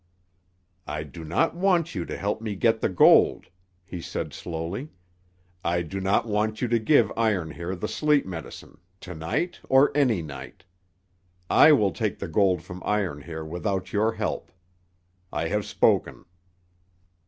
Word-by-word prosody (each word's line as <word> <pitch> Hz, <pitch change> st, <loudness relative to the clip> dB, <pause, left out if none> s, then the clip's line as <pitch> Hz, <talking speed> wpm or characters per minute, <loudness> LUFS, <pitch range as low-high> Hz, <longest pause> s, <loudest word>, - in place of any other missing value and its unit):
"I 75 Hz, +1 st, -3 dB
do 80 Hz, +3 st, -10 dB
not 85 Hz, -, +1 dB
want 175 Hz, -3 st, +1 dB
you 90 Hz, -4 st, -3 dB
to -, -, -5 dB
help 100 Hz, +2 st, -2 dB
me 110 Hz, -2 st, -4 dB
get 115 Hz, +3 st, +2 dB
the -, -, +1 dB
gold," 90 Hz, -, +5 dB, 0.4 s
he 90 Hz, -2 st, -7 dB
said -, -, -5 dB
slowly. 85 Hz, -, -5 dB, 0.7 s
"I 85 Hz, 0 st, 0 dB
do 95 Hz, +4 st, -5 dB
not 95 Hz, +4 st, +2 dB
want 110 Hz, 0 st, -1 dB
you 125 Hz, -, 0 dB
to 120 Hz, 0 st, +2 dB
give 110 Hz, -1 st, +3 dB
Iron 100 Hz, -8 st, 0 dB
Hair 85 Hz, +5 st, -5 dB
the 90 Hz, -, -4 dB
sleep 150 Hz, -2 st, +2 dB
medicine, 85 Hz, -2 st, -9 dB, 0.2 s
to 90 Hz, -, -8 dB
night, 115 Hz, -, -3 dB
or 135 Hz, +2 st, +5 dB
any 120 Hz, -, +2 dB
night. 75 Hz, +3 st, -10 dB, 0.9 s
I 155 Hz, -, +7 dB
will 105 Hz, -9 st, +3 dB
take 110 Hz, -4 st, -2 dB
the 95 Hz, -, -5 dB
gold 90 Hz, 0 st, +2 dB
from 90 Hz, 0 st, -9 dB
Iron 95 Hz, -9 st, -1 dB
Hair 80 Hz, +1 st, -7 dB
without 90 Hz, +3 st, -3 dB
your 110 Hz, +2 st, +2 dB
help. -, -, -4 dB, 0.8 s
I -, -, -2 dB
have -, -, -1 dB
spoken." -, -, +1 dB
95 Hz, 155 wpm, -25 LUFS, 85-115 Hz, 0.9 s, I